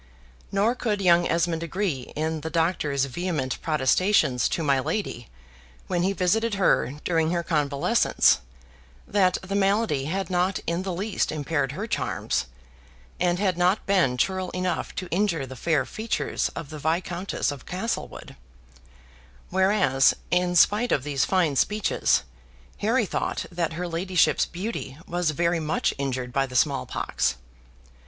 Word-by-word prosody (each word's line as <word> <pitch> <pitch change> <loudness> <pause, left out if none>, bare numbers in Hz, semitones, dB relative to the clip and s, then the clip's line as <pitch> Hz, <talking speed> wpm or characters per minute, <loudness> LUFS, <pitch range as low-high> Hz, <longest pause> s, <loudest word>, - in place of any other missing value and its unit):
Nor 205 +4 +2
could 220 -5 -1
young 175 -2 +4
Esmond 165 -1 0
agree 170 -6 -3
in 155 +1 -2
the 160 - -4
Doctor's 160 -5 +1
vehement 140 -2 -3
protestations 150 - +2
to 165 - -1
my 140 -3 +3
lady, 130 - -3 0.6
when 175 - -1
he 190 +2 +2
visited 205 +4 +1
her 180 -8 +2
during 165 -2 +1
her 170 0 0
convalescence, 145 -4 +2 0.7
that 190 -3 +2
the 190 +1 -5
malady 200 -7 +1
had 190 +5 -3
not 180 +2 +1
in 170 +2 -1
the 190 0 -3
least 195 +4 -1
impaired 145 -3 -1
her 195 +8 -4
charms, 60 - -2 0.7
and 175 0 +2
had 185 -2 0
not 180 +4 +2
been 180 -11 +2
churl 185 +5 0
enough 185 0 -2
to 185 - -4
injure 175 -6 0
the 130 0 -9
fair 150 +2 +1
features 220 +1 -2
of 160 -3 -6
the 155 - -7
Viscountess 170 +3 -1
of 140 -2 -9
Castlewood; 190 +6 -4 1.2
whereas, 190 -8 +3 0.2
in 180 0 +2
spite 210 +7 +4
of 130 - +2
these 140 -2 0
fine 175 -7 +1
speeches, 210 +9 +2 0.6
Harry 225 +2 +2
thought - - -2
that 170 -2 -2
her 175 +2 -3
ladyship's 175 +2 +2
beauty 175 - -5
was 175 -1 0
very 170 +2 +1
much 155 0 0
injured 130 -3 -3
by 135 -1 +1
the 125 - -10
small 90 - +2
pox. - - -1
175 Hz, 145 wpm, -25 LUFS, 145-190 Hz, 1.2 s, young